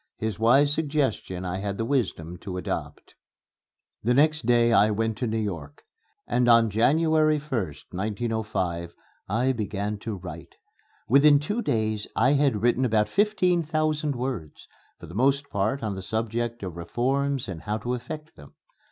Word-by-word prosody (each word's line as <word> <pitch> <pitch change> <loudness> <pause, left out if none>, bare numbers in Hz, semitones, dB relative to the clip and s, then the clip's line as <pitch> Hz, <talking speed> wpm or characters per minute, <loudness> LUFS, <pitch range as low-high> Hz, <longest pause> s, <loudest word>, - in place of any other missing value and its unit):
His 110 -2 -3
wise 135 +6 +5
suggestion 140 - -1
I 90 +1 -2
had 100 0 -3
the 115 - -1
wisdom 100 - -1
to 90 0 -6
adopt. 90 - -5 0.9
The 120 +3 +2
next 150 -2 +3
day 120 -1 +4
I 105 0 +5
went 110 +1 0
to 125 - -1
New 110 0 -1
York, 105 - -5 0.4
and 120 0 +1
on 115 -2 +5
January 155 +7 +3
1st, 120 - -4
1905, 100 -4 -2 0.3
I 120 +6 +2
began 105 -3 -3
to 110 0 -4
write. 90 0 -9 0.5
Within 145 +4 +6
two 205 +11 -2
days 110 - -1
I 130 +4 +4
had 135 -7 +2
written 120 +2 +3
about 110 -3 +2
fifteen 185 - +2
thousand 155 -2 -1
words 120 - -5 0.3
for - - -10
the 85 - -11
most 140 +6 +2
part 110 +6 -1
on 105 -2 -1
the 95 - -6
subject 115 +2 -3
of 90 -3 -6
reforms 135 +9 -1
and 90 -4 -6
how 105 +5 -2
to 120 +3 -3
effect 150 +5 -7
them. - - -15
115 Hz, 160 wpm, -26 LUFS, 105-140 Hz, 0.9 s, Within